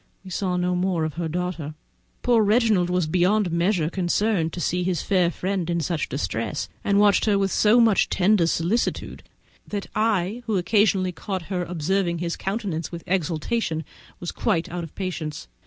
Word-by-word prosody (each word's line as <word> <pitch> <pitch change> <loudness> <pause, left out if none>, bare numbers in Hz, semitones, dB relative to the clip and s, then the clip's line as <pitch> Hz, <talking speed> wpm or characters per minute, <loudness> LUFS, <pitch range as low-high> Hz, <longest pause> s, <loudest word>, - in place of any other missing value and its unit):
We 185 - -9
saw 180 0 -1
no 180 0 0
more 180 -2 0
of 155 - -4
her 165 +2 -3
daughter. 170 -3 -3 0.5
Poor 240 -2 +4
Reginald 210 -4 +3
was 180 -1 +1
beyond 185 +4 +2
measure 170 -1 +1
concerned 180 0 0
to - - -5
see 180 +1 0
his 180 -2 -1
fair 185 -4 +2
friend 185 0 -2
in 170 0 0
such 165 0 -2
distress, - - -2 0.2
and 200 0 +2
watched 205 -1 +4
her 210 -2 +3
with 195 -1 +1
so 220 +3 +4
much 225 -4 +4
tender 185 -2 +3
solicitude, 175 +8 -1 0.5
that 205 -1 -4
I, 215 0 0
who 215 -3 +1
occasionally 190 -1 +2
caught 185 +2 -5
her 180 -1 0
observing 175 +1 -1
his 170 0 -2
countenance 190 -6 -3
with 170 -1 -7
exultation, 170 0 -1 0.3
was 175 - -4
quite 165 0 0
out 175 0 -4
of 165 - -10
patience. 160 - -4
180 Hz, 170 wpm, -24 LUFS, 170-200 Hz, 0.5 s, Poor